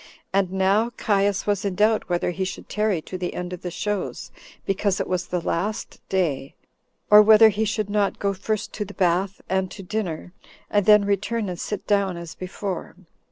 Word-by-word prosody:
And 195 -2 +2
now 195 +4 +2
Caius 200 -2 +1
was 205 -2 0
in 200 -2 -2
doubt 215 +1 +2
whether 175 0 0
he 190 +2 -3
should 185 - -6
tarry 210 -6 0
to 185 - -7
the 180 - -3
end 180 0 -4
of 180 - -7
the 180 - -4
shows, 205 +3 -3 0.3
because 195 0 0
it - - -2
was 180 -1 -2
the 180 - -1
last 195 +6 -3
day, 150 -8 -1 0.6
or 210 0 +10
whether 220 +1 +8
he 215 +1 0
should 215 -1 -1
not 205 -1 0
go 200 0 0
first 210 +2 -3
to 210 - -3
the 205 0 -11
bath, 185 +1 +1
and 190 0 0
to 195 - -9
dinner, 180 -4 -4 0.4
and 205 -2 +2
then 210 -1 +7
return 205 +2 -1
and 175 -1 -5
sit 210 - -4
down 200 -3 +1
as 170 -1 -7
before. 185 0 -5
195 Hz, 195 wpm, -24 LUFS, 180-210 Hz, 0.6 s, or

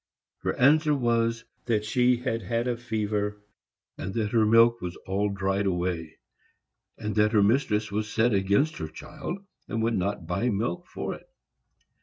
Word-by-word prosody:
Her - - -2
answer 150 +3 +4
was 115 -2 +1 0.2
that 110 -3 0
she 125 +2 +3
had 120 -2 -2
had 115 +5 -1
a 125 - 0
fever, 105 -3 -2 0.6
and 95 +1 -5
that 110 -2 -1
her 110 -2 +3
milk 115 +1 +5
was 90 -1 -4
all 100 +2 0
dried 100 0 0
away; 85 -3 -2 0.8
and 105 0 -3
that 105 +1 +3
her 105 -2 +5
mistress 110 -2 +1
was 105 +1 -2
set 110 +2 +2
against 100 +11 +2
her 80 - -4
child, 170 - -7 0.3
and 115 -1 -2
would 115 0 +1
not 95 -1 -2
buy 95 +9 0
milk 120 - -2
for - - -4
it. - - -13
110 Hz, 165 wpm, -27 LUFS, 100-120 Hz, 0.8 s, milk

